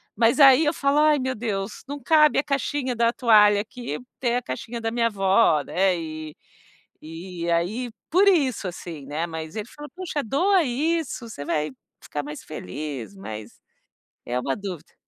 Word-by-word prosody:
Mas 230 +6 +3
aí 275 +2 +8
eu 295 - +2
falo: 280 0 +1
“Ai, 300 -1 +4
meu 260 0 -2
Deus, 210 -2 -4
não 285 0 -6
cabe 305 +2 +5
a - - +1
caixinha 275 -2 -1
da 235 0 +2
toalha 210 -5 +5
aqui 240 +3 -6 0.2
tem 245 -1 +1
a - - -1
caixinha 230 - -5
da 225 - -1
minha 235 0 +1
avó, 195 -6 +3
né.”, 185 +2 +1
e 155 -2 -7 0.7
e 170 +1 -6
aí 200 +9 0 0.2
por 375 +5 +4
isso, 275 - +2
assim, 170 -5 -8
né. 155 +4 -2
Mas 160 -1 -7
ele 215 +1 -4
fala: 295 +3 -10
“Puxa, 355 -5 -3
doa 360 - +3
isso, 285 -1 -1
você 180 -10 -8
vai 150 +1 -1 0.3
ficar 145 - -4
mais 150 +1 -7
feliz”, 135 -3 -6
mas 105 +3 -8 0.7
é 125 +1 -1
uma 135 +1 -1
dúvida. 180 -5 -7
220 Hz, 170 wpm, -24 LUFS, 160-270 Hz, 0.7 s, aí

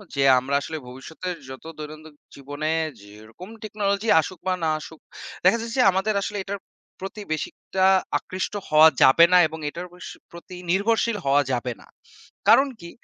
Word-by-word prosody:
যে, 140 - 0 0.2
আমরা 140 +2 -2
আসলে 160 +2 -5
ভবিষ্যতের 160 +8 -7
যত 130 - -10
দৈনন্দিন 155 0 -10 0.2
জীবনে 145 +2 -5 0.3
যেরকম 110 - -13
টেকনোলজি 210 0 -2
আসুক 185 +3 -8
বা 185 - +2
না 160 - +2
আসুক, 160 +1 -11 0.5
দেখা 190 +6 +5
যাচ্ছে 230 +3 -4
আমাদের 195 +3 0
আসলে 210 +1 -4
এটার 200 +1 -5 0.4
প্রতি 195 +2 -7
বেশি 155 - -3
একটা 190 0 -1 0.3
আকৃষ্ট 185 +2 -5 0.2
হওয়া 155 +1 +8
যাবে 165 +6 +7
না - - +8
এবং 160 +1 -9
এটার 175 +4 -7
বেশ 180 - -10 0.2
প্রতি 170 +1 -11 0.2
নির্ভরশীল 220 +3 +1
হওয়া 140 +1 +4
যাবে 125 0 -1
না। - - -18 0.6
কারণ 275 +1 +6
কি? 170 - -9
170 Hz, 160 wpm, -24 LUFS, 145-195 Hz, 0.6 s, হওয়া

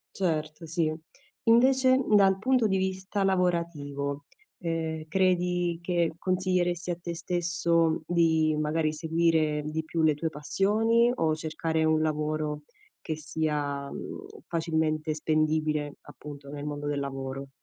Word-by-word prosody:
Certo, 155 -3 -2
sì. 160 -1 0 0.5
Invece, 260 +3 +5 0.2
dal 195 -1 +5
punto 250 0 +3
di 190 -2 +1
vista 190 +1 -1
lavorativo, 155 -7 -1 0.3
ehm, 160 -2 -3
credi 180 -1 +1
che 170 -2 0
consiglieresti 180 -1 0
a 175 - -1
te 170 0 -5
stesso 170 -1 +1
di, 160 -2 +3
magari, 155 +1 +1
seguire 160 -1 +1
di 155 +1 -3
più 165 +1 -2
le 155 -2 +4
tue 160 +3 -2
passioni 220 +10 +2
o 160 -5 +1
cercare 160 0 -1
un 155 0 +3
lavoro 155 -1 -1 0.4
che 155 - -3
sia, 150 -2 -2
mhmm, 400 - -7 0.2
facilmente 160 -2 0
spendibile, 155 -1 0
appunto, 145 -1 -11
nel 145 0 -6
mondo 145 0 -4
del 145 -1 -1
lavoro? 135 0 -5
160 Hz, 125 wpm, -28 LUFS, 155-175 Hz, 0.5 s, Invece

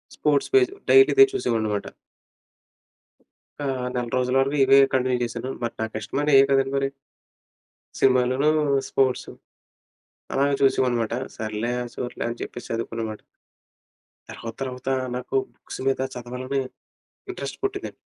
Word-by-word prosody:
Sports 145 -2 +1
page 385 -2 +5 0.2
daily 400 -1 +8
ఇదే 405 0 +9
చూసేవాడిననమాట. 110 - -1 1.8
ఆహ్, 130 -2 -2
నెల 120 -1 -1
రోజుల 125 0 0
వరకు 140 +2 0
ఇవే 135 +1 +6
కంటిన్యూ 130 -1 +1
చేశాను. 120 +2 -5
మరి 120 - -3
నాకిష్టమైన 110 +7 -2
ఇవే 135 0 +8
కదండి! 135 0 +2
మరి. 135 0 +1 1.1
సినిమాలను 130 +2 +3 0.4
స్పోర్ట్సు. 130 -2 +1 1.0
అలాగే 140 +1 +2
చూసావాడిననమాట. 120 -4 +2 0.2
సర్లే 110 +2 -2 0.2
సర్లే 125 - -4
అని 120 - -5
చెప్పేసి 120 - -7
చదువుకుననమాట. 115 -1 -4 1.1
తర్వాతర్వాత 125 +3 -6 0.3
నాకు 125 - -5 0.2
బుక్స్ - - -9
మీద 135 - +1
చదవాలని 125 +2 -3 0.7
ఇంట్రెస్ట్ 380 - -6
పుట్టిందండి. 400 0 -3
130 Hz, 110 wpm, -24 LUFS, 120-135 Hz, 1.8 s, ఇదే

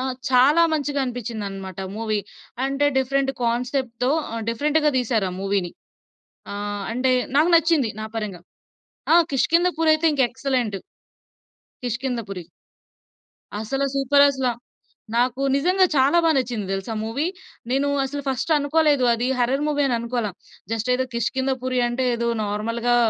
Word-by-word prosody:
ఆ! - - -2 0.3
చాలా 275 +6 +5
మంచిగా 290 -2 -1
అనిపిచ్చిందనమాట 210 -7 -5 0.2
మూవీ. 215 -1 -1 0.5
అంటే, 275 +2 +1
డిఫరెంట్ 270 +1 +1
కాన్సెప్ట్‌తో 250 +1 -1 0.2
ఆహ్, 230 0 -3
డిఫరెంట్‌గా 300 +6 +2
దీశారు 230 -5 0
ఆ - - -7
మూవీని. 195 -2 -1 0.8
ఆహ్, 205 0 -4
అంటే, 255 +2 +1 0.2
నాకు 310 +4 +4
నచ్చింది 325 -7 +3
నా - - -4
పరంగా. 205 -6 -4 0.7
ఆ! - - +8 0.2
'కిష్కింధపురి' 325 +3 +3
అయితే 310 +1 0
ఇంక 280 -2 +2
ఎక్సలెంటు. 245 -5 -2 1.1
కిష్కింధపురి. 235 -7 -3 1.2
అసల 270 +5 -2
సూపరసల. 275 -1 +3 0.7
నాకు 250 +2 +1
నిజంగా, 365 +7 +3
చాలా 275 +5 +4
బా 330 - +5
నచ్చింది 240 -6 -1
దెలుసా 195 +4 -4
మూవీ. 225 +8 -2 0.5
నేను 275 +2 +1 0.2
అసలు 285 +2 -4
ఫస్టనుకోలేదు, 290 +1 +2
అది 240 +2 -1
హర్రర్ 265 +4 +1
మూవీ 290 -1 0
అననుకోల. 235 -2 -1 0.4
జస్టేదో 250 +3 0
కిష్కిందపురి 255 +2 -1
అంటే, 245 +2 -1
ఏదో 235 0 -2 0.2
నార్మల్‌‌గా 230 +4 0
255 Hz, 120 wpm, -23 LUFS, 230-280 Hz, 1.2 s, ఆ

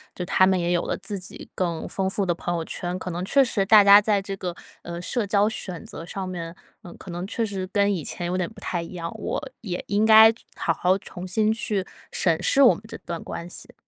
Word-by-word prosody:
就 180 - -4
他 185 +1 +4
们 190 -1 +2
也 175 0 0
有 175 -1 +1
了 - - -2
自 205 -2 -5
己 180 - -10
更 170 -3 -2
丰 190 -1 -1
富 200 +1 -1
的 175 - +1
朋 175 +1 -3
友 165 - -2
圈， 175 +2 -3
可 185 - -5
能 175 +1 -4
确 275 +7 +5
实 215 -6 0
大 210 +1 +7
家 200 +1 +9
在 210 -1 +1
这 195 0 -5
个， 180 -3 -4 0.3
呃， 170 0 -6
社 220 +5 -1
交 205 +1 +2
选 185 -5 -6
择 165 - -9
上 190 +2 -5
面， 170 -2 -6 0.3
嗯， 175 - -11
可 - - -11
能 175 +1 -4
确 230 +4 -2
实 195 -3 -4
跟 205 -1 +3
以 170 -5 -3
前 175 +3 -4
有 180 +1 -1
点 180 -2 -1
不 220 - -15
太 175 - -2
一 170 - -10
样， 170 -2 -5
我 - - -3 0.2
也 185 -5 -4
应 205 +2 +2
该 220 0 +9 0.2
好 - - 0
好 180 +1 +2
重 180 -1 -7
新 215 +4 +2
去 215 -3 -1 0.3
审 165 -3 +1
视 275 - +3
我 260 - +7
们 - - -13
这 225 - -8
段 170 -1 -6
关 170 - -7
系。 - - -9
185 Hz, 270 characters per minute, -24 LUFS, 175-205 Hz, 0.3 s, 家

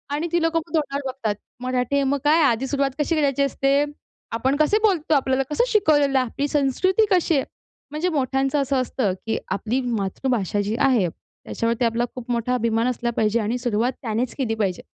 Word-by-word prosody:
आणि 315 +4 -2
ती 345 - +2
लोकं 330 0 +2
मग 330 - -18
तोंडावर 285 -2 -1
बघतात. 230 -5 -2 0.3
"मराठी 255 +1 -1
आहे, 280 - +3
मग 275 +1 +1
काय 305 +3 +4
आधी 260 -1 +2
सुरुवात 275 0 0
कशी 300 +3 +1
करायची 280 -3 +1
असते? 275 +1 +2 0.5
आपण 255 +4 0
कसे 310 +7 +3
बोलतो? 350 -7 +2
आपल्याला 265 -1 +1
कसं 305 +11 +2
शिकवलेलं 300 - +3
आहे? 255 - 0
आपली 280 +5 -2
संस्कृती 300 - +2
कशी 350 -3 +3
आहे?" 270 - +1 0.5
म्हणजे 310 +5 -1
मोठ्यांचं 270 -2 0
असं 275 0 -1
असतं, 240 -5 -1
की 225 - -1
आपली 230 +5 -1
मातृभाषा 220 -2 -1
जी 205 +2 -2
आहे 255 -9 +3
त्याच्यावरती 230 +7 -3
आपला 230 +1 +1
खूप 245 -1 -6
मोठा 235 +1 0
अभिमान 230 -1 +1
असला 240 -1 -1
पाहिजे 220 +1 +2
आणि 225 +3 -1
सुरुवात 240 0 0
त्यानेच 230 +1 -2
केली 240 -5 -1
पाहिजे. 195 -5 -1
265 Hz, 190 wpm, -23 LUFS, 230-290 Hz, 0.5 s, काय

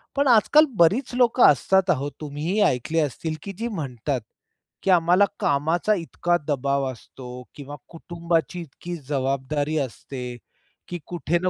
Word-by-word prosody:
पण 280 0 +2
आजकाल 260 +6 +6
बरीच 210 +11 +3
लोकं 245 0 +3
असतात 190 +7 +2
आहो, 145 -4 +1
तुम्हीही 155 +7 -2
ऐकले 145 +6 -1
असतील, 155 +2 -2
की 200 - -5
जी 230 +2 -2
म्हणतात, 140 - -3 0.6
की - - -1
आम्हाला 180 +3 +5
कामाचा 160 +8 +1
इतका 175 0 -1
दबाव 140 -1 0
असतो 125 +1 -12 0.3
किंवा 145 0 -8
कुटुंबाची 170 -1 -2
इतकी 170 +3 -8
जबाबदारी 140 +2 -1
असते, 125 -1 -5 0.5
की 175 - -5
कुठे 175 -1 -1
ना 185 - +1
160 Hz, 135 wpm, -24 LUFS, 140-180 Hz, 0.6 s, आजकाल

